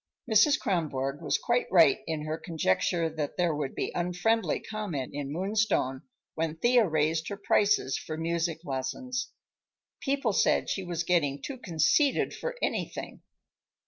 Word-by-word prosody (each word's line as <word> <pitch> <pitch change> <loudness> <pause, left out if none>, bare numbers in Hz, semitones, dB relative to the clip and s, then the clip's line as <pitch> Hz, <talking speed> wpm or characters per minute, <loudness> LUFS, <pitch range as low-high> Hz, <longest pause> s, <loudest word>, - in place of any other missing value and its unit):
Mrs. 265 +8 +5
Kronborg 145 -6 -1
was - - +1
quite 240 +1 0
right 170 -3 +6
in 160 -2 -2
her 155 0 -2
conjecture 165 - 0
that 155 -2 -4
there 175 -3 +2
would 145 -2 -3
be - - -2
unfriendly 180 +2 0
comment 200 -12 -4
in 140 -1 -4
Moonstone 190 -7 0 0.3
when 160 -1 -2
Thea 240 +2 +4
raised 160 +1 +1
her 200 - -4
prices 205 -8 +2
for 155 - -6
music 165 0 -1
lessons. 250 - -3 0.7
People 275 -6 0
said - - +2
she 195 - -2
was 175 -1 -2
getting 150 -6 +1
too 270 -3 -6
conceited 245 - +2
for - - -4
anything. - - -3
170 Hz, 145 wpm, -28 LUFS, 155-215 Hz, 0.7 s, right